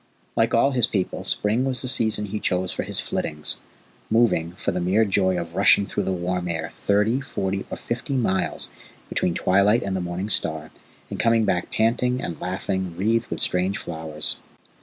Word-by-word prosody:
Like 115 +1 +2
all 135 +4 +4
his 125 -3 +3
people, 95 -3 -2
spring 110 +5 +2
was 130 -2 -1
the - - -2
season 110 -4 +2
he 105 +1 -4
chose 90 -2 0
for - - -3
his - - -2
flittings 75 0 -2 0.5
moving, 110 -7 +2
for - - -2
the 90 - -2
mere 100 +6 +3
joy 95 -2 +2
of 85 -1 -6
rushing 100 +1 +5
through - - -3
the - - 0
warm 90 0 -2
air, 80 -1 -3
thirty, 105 +6 +1
forty, 95 -7 -3
or - - -5
fifty 120 +4 -4
miles 95 -9 0 0.4
between 85 - 0
twilight 100 +5 +3
and 95 -1 -2
the 95 - -1
morning 90 +4 -3
star, 80 -3 +1 0.4
and - - -5
coming 115 -1 +3
back 90 -3 -1
panting 125 +3 +1
and 85 - -5
laughing 95 +1 -2
and 85 -1 -11
wreathed 115 +5 +1
with - - -2
strange 90 +2 +2
flowers. 80 -2 -1
95 Hz, 185 wpm, -23 LUFS, 90-115 Hz, 0.5 s, rushing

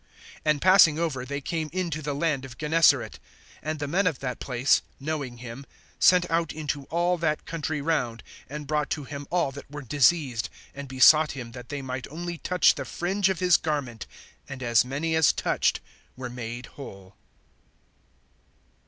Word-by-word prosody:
(34)And 150 -1 +2
passing 185 -5 +6
over, 150 -7 -2
they 140 +1 -3
came 160 +2 -3
into 170 -4 -2
the 145 -1 -3
land 145 -3 0
of 125 -3 -10
Gennesaret. 160 +2 +3 0.4
(35)And 155 +1 -2
the 145 0 -4
men 180 +6 +1
of 160 -7 0
that 125 -2 -5
place, 130 +1 +2 0.2
knowing 140 -4 -4
him, 120 +2 -8 0.4
sent 180 -1 +5
out 165 -1 +1
into 145 -2 -4
all 175 +3 0
that 155 -2 -1
country 155 -2 -3
round, 130 -7 -1 0.3
and 150 +1 -6
brought 150 0 -1
to 150 - -2
him 140 0 -7
all 170 -6 +1
that 140 +1 -11
were 145 0 -7
diseased 135 -2 +2 0.3
(36)and 140 0 -7
besought 150 +4 +6
him 125 -4 -7
that 125 0 -10
they 145 -1 -4
might 130 -1 -5
only 170 +2 -6
touch 180 0 +4
the - - -5
fringe 190 +3 0
of 185 -3 -2
his 180 -2 +5
garment; 140 -8 -3 0.4
and 135 -2 -7
as 120 -2 +4
many 145 +6 -2
as 160 -2 +5
touched - - 0 0.4
were 125 -1 -6
made 120 0 -6
whole. 100 -10 -11
145 Hz, 170 wpm, -26 LUFS, 130-165 Hz, 0.4 s, passing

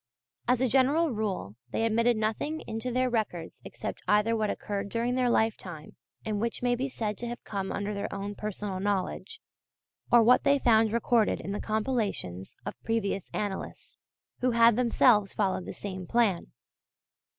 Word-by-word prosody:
As 250 0 +3
a 260 - +3
general 275 +6 +3
rule 195 - -3
they 225 - 0
admitted 230 +1 +2
nothing 220 +9 -1
into 225 +3 -4
their 255 +1 +2
records 210 -9 -3
except - - -6
either 210 +2 +3
what 215 -2 0
occurred 200 -1 -3
during 235 +3 -1
their 250 -1 +2
lifetime, 185 -9 -1 0.3
and 210 -2 -1
which 235 +1 -2
may 245 0 +3
be 260 +3 -1
said 215 -5 -3
to 240 - -4
have 240 +1 -6
come 195 -2 -4
under 205 +1 -2
their 200 - -4
own 200 +1 -4
personal 205 -2 -4
knowledge, 195 -1 -2 0.7
or 240 -1 +7
what 250 +3 +5
they 280 0 +4
found 225 -4 +4
recorded 230 -1 +2
in 195 - -5
the 205 - -3
compilations 215 - -2
of - - -6
previous 200 -4 -1
annalists, 205 -2 -5 0.4
who 255 - +2
had 230 -1 +5
themselves 235 -4 +3
followed 190 -3 0
the - - -4
same 185 -3 -6
plan. 220 -7 +2
220 Hz, 165 wpm, -28 LUFS, 200-240 Hz, 0.7 s, or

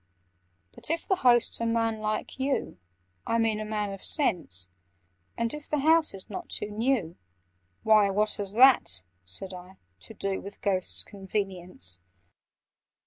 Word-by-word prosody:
"But - - -2
if 330 +1 -2
the 380 - +2
host's 240 -4 +3
a - - 0
man 230 -1 0
like 215 +4 -3
you— 265 - -1 0.5
I 230 - +1
mean 225 -2 +1
a - - -3
man 210 -2 -2
of 195 - -10
sense; 160 - 0 0.7
And 230 0 0
if 300 0 -8
the 300 - 0
house 315 -3 +3
is 190 - -6
not 360 -1 -7
too 210 - -1
new—" 220 -6 0 0.7
"Why, 215 -2 +5
what 210 +2 +1
has 200 -2 -2
that," 235 - +6 0.2
said 185 - -6
I, 180 +1 -11 0.2
"to 90 - -10
do 195 -1 -2
With 200 - -10
Ghost's 190 -3 0
convenience?" 185 - -4
210 Hz, 150 wpm, -28 LUFS, 190-235 Hz, 0.7 s, that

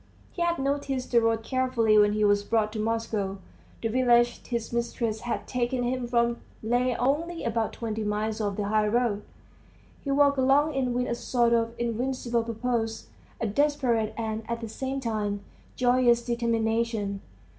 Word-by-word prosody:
He 345 - -6
had 345 0 +2
noticed 275 -1 -2
the 235 -1 +5
road 225 0 +1
carefully 255 -3 +2
when 210 0 +5
he 215 0 +1
was 205 0 +3
brought 215 0 0
to 220 - -4
Moscow; 215 -3 -1 0.5
the - - +2
village 240 0 +3
his 235 -2 -3
mistress 235 -2 -1
had 240 - -3
taken 245 0 -1
him 250 0 -1
from 235 0 +1 0.2
lay 245 +2 +1
only 325 +7 -1
about 230 -1 -1
twenty 220 -2 -3
miles 215 +1 -1
off 205 -2 -2
the 205 -1 -1
high 215 0 +2
road. 225 -2 +1 0.8
He 280 - -4
walked 280 0 +4
along 280 +4 +3
it 270 -2 0
with 245 0 0
a - - -1
sort 235 0 +1
of 230 0 +1
invincible 240 0 -1
purpose, 225 -1 -2 0.3
a - - -1
desperate 235 -2 +1
and 220 -1 -2
at 235 0 -2
the 225 - -5
same 265 +4 -3
time 210 -4 -2 0.3
joyous 245 -1 +3
determination. 230 -3 0
235 Hz, 165 wpm, -27 LUFS, 220-255 Hz, 0.8 s, the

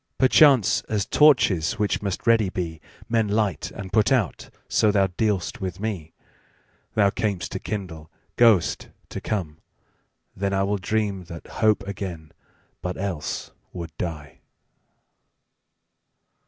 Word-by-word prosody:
Perchance, 130 - +5
as 105 -3 0
torches, 115 - +4
which 105 -1 -1
must 100 +4 -3
ready 115 -4 +4
be, 85 -3 -4 0.3
Men 115 -2 +1
light 105 -1 0
and 95 -1 -9
put 110 +1 +3
out, 120 -9 0 0.2
so 110 - +3
thou 100 -2 +3
dealst 100 +3 -1
with 95 -1 -4
me. 95 -7 -4 0.8
Thou 100 -2 +4
cam'st 100 -6 -2
to 95 - -3
kindle, 85 -8 -6 0.3
goest 115 -7 +3 0.2
to - - -6
come: 85 -8 -3 0.8
then 100 +1 -1
IWill 100 0 0
dream 100 -1 -1
that 85 -2 -9
hope 105 -2 +1
again, 90 -6 -6 0.5
but 90 +2 -4
else 95 -6 -4 0.2
would 85 -3 -7
die. 75 -3 -5
100 Hz, 125 wpm, -24 LUFS, 90-110 Hz, 0.8 s, Perchance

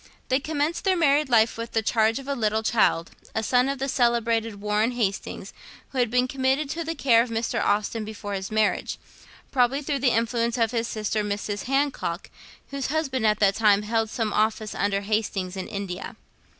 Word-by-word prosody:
They 260 - +3
commenced 305 +3 -2
their 380 -2 +2
married 295 -3 +3
life 225 -2 +4
with 230 - -5
the 225 - +1
charge 220 0 +2
of 275 0 -8
a 280 - 0
little 220 -3 0
child, 215 -7 +2 0.2
a 220 - 0
son 250 +3 +3
of 275 - -2
the 270 +1 -2
celebrated 230 -4 +1
Warren 210 +3 +1
Hastings, 210 -5 -3 0.4
who 265 - -4
had 245 -2 +2
been 250 +2 +2
committed 270 +2 0
to 335 +1 -3
the 330 +1 -4
care 245 -6 +4
of 240 - -2
Mr. 225 0 -1
Austen 210 +2 0
before 210 -1 -6
his 190 -1 -4
marriage, 215 -1 0 0.5
probably 265 +2 +2
through 280 -1 -1
the 260 -1 +3
influence 235 +1 0
of 225 -2 +2
his 230 -1 -1
sister, 215 -1 -2
Mrs. 205 0 -3
Hancock, 270 -10 -1 0.4
whose 275 -2 -2
husband 270 -6 0
at 210 - +3
that 200 -1 +5
time 210 -1 +3
held 225 +1 0
some 220 -2 -2
office 215 0 0
under 200 0 0
Hastings 200 -3 -2
in 190 - -5
India. 195 -2 -5
230 Hz, 190 wpm, -25 LUFS, 210-265 Hz, 0.5 s, that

